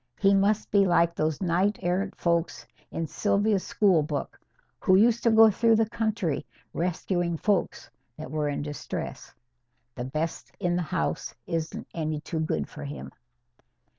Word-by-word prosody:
He 195 0 +4
must 200 +2 +2
be 200 -1 +4
like 170 -1 +3
those 155 -2 -1
knight 185 +4 +1
errant 185 +3 -1
folks 170 -1 0 0.2
in 165 - -3
Sylvia's 200 +6 +1
school 190 -6 +3
book, 150 -1 -4 0.4
who 185 - +4
used 230 +4 +4
to 235 - +3
go 220 0 +7
through 225 +2 +3
the 220 0 +2
country 220 - -1 0.3
rescuing 175 0 -1
folks 200 +2 0 0.3
that 125 - -8
were 150 -1 0
in 145 - -3
distress. 145 0 -6 0.6
The 120 0 -5
best 155 +5 -4
in 175 -3 0
the 180 - 0
house 75 - -2
isn't 165 -1 -3
any 155 -2 -2
too 160 +1 -4
good 155 - -1
for 150 - -9
him." 145 +1 -7
175 Hz, 155 wpm, -27 LUFS, 155-205 Hz, 0.6 s, go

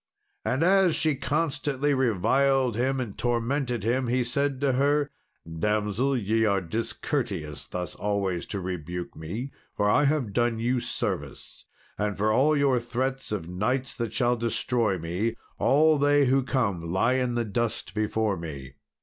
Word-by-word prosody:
And 130 +5 0
as 190 -2 +4
she 155 -2 +2
constantly 145 -1 0
reviled 130 +1 +2
him 130 +3 0
and 115 -6 -4
tormented 120 0 -1
him, 125 +3 +1
he 125 +1 +1
said 135 +3 -1
to 140 -1 +3
her, 145 +2 +2 0.3
"Damsel, 105 +9 0
ye 110 0 +1
are 100 -3 +3
discourteous 110 - -3
thus 90 -3 -4
always 100 -4 -2
to 100 - -3
rebuke 90 -1 -5
me, 105 - -5 0.3
for 105 - +2
I 145 +8 +4
have 140 -8 0
done 120 +1 +1
you 120 +3 +1
service; - - -4 0.3
and 105 -2 -1
for 105 +2 +2
all 150 +5 +4
your 140 -3 +3
threats 130 +2 -3
of 95 -6 -3
knights 115 +9 -1
that 115 -4 -3
shall 120 +1 +2
destroy 115 -2 0
me, 90 +8 -2 0.2
all 155 +2 +4
they 145 0 +4
who 135 +1 +3
come 100 -11 -1
lie 105 +7 +2
in 125 -2 0
the 120 -1 0
dust 110 -3 -2
before 110 -1 0
me. 70 -6 -7
120 Hz, 155 wpm, -27 LUFS, 100-135 Hz, 0.3 s, as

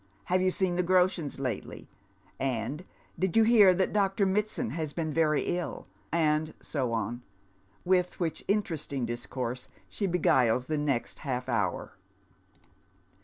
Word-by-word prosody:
" - - -35
Have 185 - +4
you 185 - +3
seen 185 -1 0
the 180 +1 +1
Groshens 180 -5 +1
lately? 125 -6 -4 0.4
" - - -33 0.2
and 145 +11 -5 0.2
" - - -23
Did 190 +2 +1
you 225 - +7
hear 220 -4 +7
that 190 +1 0
Dr. 200 -1 +2
Mitsand 200 - 0
has 155 0 -3
been 160 -3 -2
very 155 -2 +2
ill? 175 -1 -3 0.2
" 100 - -36
and 155 -1 +1
so 130 -6 -2
on; 115 +2 -2 0.6
with 180 0 +1
which 165 -3 -2
interesting 160 - -1
discourse 120 +1 -4 0.2
she 200 - -2
beguiles 130 -9 +3
the 155 +1 -1
next 140 -5 -1
half 125 -3 -3
hour. 115 -5 -2
160 Hz, 155 wpm, -29 LUFS, 130-185 Hz, 0.6 s, you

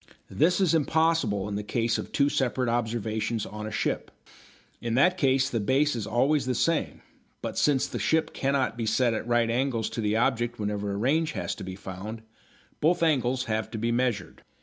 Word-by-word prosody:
This 175 +5 +3
is 185 -4 +3
impossible 160 -10 +2
in 105 - -4
the 100 - -2
case 115 +2 0
of - - -6
two 140 - +3
separate 130 -3 0
observations 115 -1 -1
on 105 0 -6
a - - -6
ship. - - -2 0.7
In 115 -1 -1
that 180 +8 +4
case 135 -5 +2
the 120 -5 -1
base 135 +7 +2
is 110 -3 -4
always 135 +4 +2
the 130 - 0
same, 165 +6 0 0.4
but - - -4
since 140 -3 +2
the 120 - -5
ship 160 +10 +1
cannot 135 -3 0
be 115 -2 -3
set 115 +2 +2
at 110 - -4
right 120 -1 +2
angles 120 -2 0
to 115 - -3
the 105 0 +1
object 120 0 0
whenever 105 -1 -2
a 100 - -3
range 150 +8 +1
has 90 -4 -3
to - - -8
be 95 0 -6
found, 100 +4 -7 0.6
both 170 +3 +2
angles 130 -5 +2
have 110 -2 -2
to 115 - -5
be 115 +2 0
measured. 120 -5 -1
120 Hz, 195 wpm, -27 LUFS, 110-140 Hz, 0.7 s, that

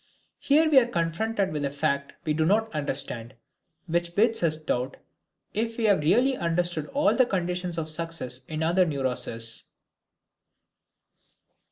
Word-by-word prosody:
Here 310 +3 +4
we 295 -4 +7
are 240 - 0
confronted 190 +1 -1
with 150 -1 -2
a 140 - 0
fact 140 0 -1
we 155 - +1
do 155 +1 +1
not 215 +5 +1
understand, 135 -5 -2 0.5
which 170 0 -1
bids 225 +2 +3
us 160 -2 +2
doubt 130 -5 -2 0.6
if 225 +1 -2
we 235 - -2
have 205 -5 +4
really 245 - +3
understood 170 -4 0
all 290 +2 +2
the 255 -2 +4
conditions 180 -2 -2
of 160 -1 -2
success 155 -6 -3
in 155 0 -3
other 175 +3 +3
neuroses. 125 -5 -2
165 Hz, 145 wpm, -26 LUFS, 150-210 Hz, 0.6 s, we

